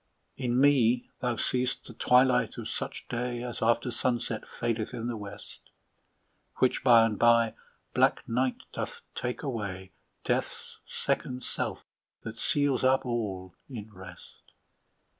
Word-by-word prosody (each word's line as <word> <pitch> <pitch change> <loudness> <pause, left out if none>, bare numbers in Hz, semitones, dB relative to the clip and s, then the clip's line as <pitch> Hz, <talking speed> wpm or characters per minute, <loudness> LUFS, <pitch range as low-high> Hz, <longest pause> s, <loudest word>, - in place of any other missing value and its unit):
In 125 -1 0
me 125 -4 +4
thou 125 -1 0
seest 125 +2 -1
the - - -10
twilight 125 0 +3
of - - -5
such - - -5
day, 120 0 -3
As 120 -1 -5
after 115 +2 +2
sunset 120 -1 -1
fadeth 115 +1 -2
in 115 -1 -4
the 120 -1 -2
west, 100 -1 -9 1.0
Which 130 - +2
by 120 -3 +7
and 110 -2 -2
by 115 -1 +5 0.4
black - - +3
night 125 +2 0
doth - - -5
take 125 +4 -3
away, 100 -8 -4 0.3
Death's - - -2
second 125 0 -2
self - - -2 0.4
that 115 0 -7
seals 145 -4 +2
up 130 +1 +3
all 100 -7 -3 0.2
in 110 -4 -8
rest. 95 0 -13
120 Hz, 135 wpm, -29 LUFS, 110-125 Hz, 1.0 s, by